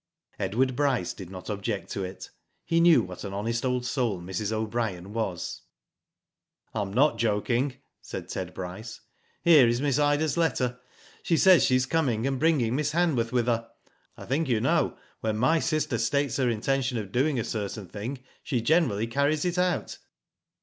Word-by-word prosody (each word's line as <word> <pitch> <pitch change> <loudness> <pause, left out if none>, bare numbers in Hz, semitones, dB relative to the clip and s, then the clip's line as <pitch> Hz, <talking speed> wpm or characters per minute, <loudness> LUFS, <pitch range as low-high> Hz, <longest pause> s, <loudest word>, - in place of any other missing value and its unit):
Edward 120 +7 0
Bryce 135 -9 +1
did 95 -4 -9
not 95 -1 -9
object 100 -2 -3
to 100 - -3
it. 95 0 -8 0.3
He 165 - +2
knew 170 -8 +6
what 90 -1 -8
an 100 -1 -5
honest 115 +3 -2
old 125 -1 0
soul 120 -8 -1
Mrs. 95 +4 -3
O'Brien 110 -4 -2
was. 105 -7 -3 0.6
" - - -51
I 110 - -1
am 100 -1 -4
not 140 +8 +3
joking," 120 +4 0 0.3
said - - -7
Ted 90 -1 -4
Bryce. 95 +5 -7 0.2
" - - -39
Here 155 -7 +7
is 120 +1 +1
Miss 140 0 +1
Ida's 145 +2 +2
letter. 125 -7 0 0.4
She 165 - +1
says 185 -1 +6
she 130 - +3
is 130 0 +2
coming, 130 -7 0
and 135 -1 -1
bringing 135 -7 +2
Miss 150 +1 0
Hanworth 150 -10 +1
with 120 -2 +1
her. 115 -1 -1 0.5
I - - -9
think 140 +3 0
you 115 -3 +2
know 155 +4 +1 0.2
when 110 -1 -1
my 130 +8 +3
sister 155 -7 0
states 140 +4 0
her 130 -3 +2
intention 130 +3 0
of 100 -4 -5
doing 135 +2 +1
a - - -1
certain 105 -2 -4
thing, 125 +8 -6 0.2
she 130 -5 -1
generally 115 -5 +2
carries 140 +6 +1
it 180 0 0
out." 180 -1 -1
120 Hz, 180 wpm, -27 LUFS, 110-145 Hz, 0.6 s, Here